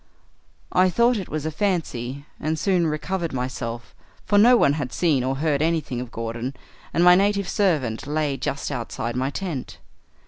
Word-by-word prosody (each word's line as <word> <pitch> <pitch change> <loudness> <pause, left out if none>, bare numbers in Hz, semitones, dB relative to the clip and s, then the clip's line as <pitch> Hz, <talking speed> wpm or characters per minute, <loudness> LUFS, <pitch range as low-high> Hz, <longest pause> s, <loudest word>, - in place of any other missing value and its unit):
"I 185 0 +4
thought 235 +6 +3
it 190 - -5
was 155 -1 -3
a 160 - -1
fancy, 145 - -2
and 155 +1 -1
soon 175 0 +2
recovered 165 +2 -2
myself, 120 -3 -4 0.3
for 205 - +4
no 240 +4 +7
one 140 - +4
had 140 -4 -3
seen 150 -8 +1
or 130 +1 0
heard 145 0 0
anything 155 -6 0
of 125 - -7
Gordon, 115 +3 -4 0.4
and 170 - +2
my 180 0 +8
native 200 +1 +2
servant 150 - 0
lay 150 -1 0
just 140 +1 -3
outside 120 -2 -4
my 130 +2 0
tent. 160 -4 -5
150 Hz, 170 wpm, -23 LUFS, 130-180 Hz, 0.4 s, my